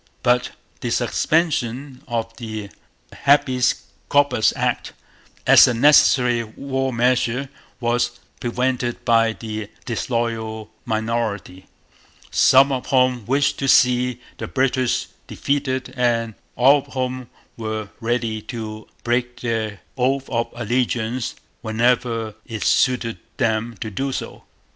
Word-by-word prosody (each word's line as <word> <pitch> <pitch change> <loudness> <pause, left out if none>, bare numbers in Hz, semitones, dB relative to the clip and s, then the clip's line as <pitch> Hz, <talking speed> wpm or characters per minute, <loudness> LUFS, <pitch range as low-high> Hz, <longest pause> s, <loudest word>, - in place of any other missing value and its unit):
But 125 0 +2 0.3
the - - -3
suspension 140 -5 0
of 115 -2 -3
the 110 -4 -6 0.4
Habeas 130 -3 +2 0.3
Corpus 145 -6 +3
Act, - - -1 0.5
as - - +8
a 125 - 0
necessary 125 -2 +5
war 135 +4 -3
measure, 125 +2 +1 0.3
was 120 0 0 0.2
prevented 125 0 -2
by 115 -1 +3
the 110 -2 -6 0.2
disloyal 115 -2 -3
minority, 110 -4 -2 0.6
some 135 +2 +5
of 130 -2 -3
whom 125 -4 +2
wished 145 +2 +1
to 135 - -1
see 125 -1 +4 0.2
the - - -4
British 130 -2 +1 0.2
defeated 130 -2 -2
and 115 -2 +1 0.2
all 135 +4 +6
of - - -13
whom 130 -1 -3 0.3
were 110 -2 -4
ready 115 -2 -1
to 110 -1 -7 0.2
break 120 0 -1
their 110 -5 -2 0.2
oath 135 +2 +1
of 115 -1 0
allegiance 120 0 -1 0.3
whenever 115 -1 0
it 110 -2 -4
suited 125 -3 +2 0.2
them 115 -2 0
to 110 - -4
do 135 +7 -2
so. - - -6
120 Hz, 115 wpm, -21 LUFS, 115-130 Hz, 0.6 s, as